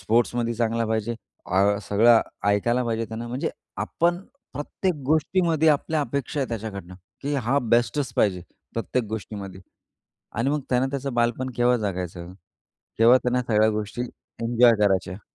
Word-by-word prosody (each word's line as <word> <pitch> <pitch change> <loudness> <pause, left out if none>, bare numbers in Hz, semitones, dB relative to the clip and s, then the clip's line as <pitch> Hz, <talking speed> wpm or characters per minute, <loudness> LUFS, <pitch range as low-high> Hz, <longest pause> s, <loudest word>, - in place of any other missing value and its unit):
स्पोर्ट्समध्ये 120 +3 +1
चांगला 115 0 0
पाहिजे, 110 +1 -1 0.3
आ 100 +2 +2
सगळं 115 +3 +6 0.3
ऐकायला 120 +5 +2
पाहिजे 115 -1 -1
त्यांने, 115 +1 -6
म्हणजे 125 +3 -2 0.3
आपण 175 +1 +1 0.3
प्रत्येक 160 +6 -2
गोष्टीमध्ये 160 +1 +2
आपल्या 155 +1 +2
अपेक्षा 140 0 -2
आहे 135 - -1
त्याच्याकडनं, 100 -5 -6 0.3
की 145 +1 -1
हा 135 +1 +1
बेस्टच 120 +2 +1
पाहिजे 90 -4 +2 0.3
प्रत्येक 115 +1 -1
गोष्टीमध्ये. 100 -3 -6 0.7
आणि 120 +4 0
मग 150 0 0
त्यानं 130 +1 +2
त्याचं 140 -2 -3
बालपण 120 +2 0
केव्हा 125 0 +3
जगायचं, 90 -4 -4 0.7
केव्हा 120 +3 +7
त्यांना 125 0 0
सगळ्या 110 -2 +3
गोष्टी 105 +3 -3 0.4
एन्जॉय 120 0 +5
करायच्या. 95 0 -1
120 Hz, 135 wpm, -24 LUFS, 105-130 Hz, 0.7 s, केव्हा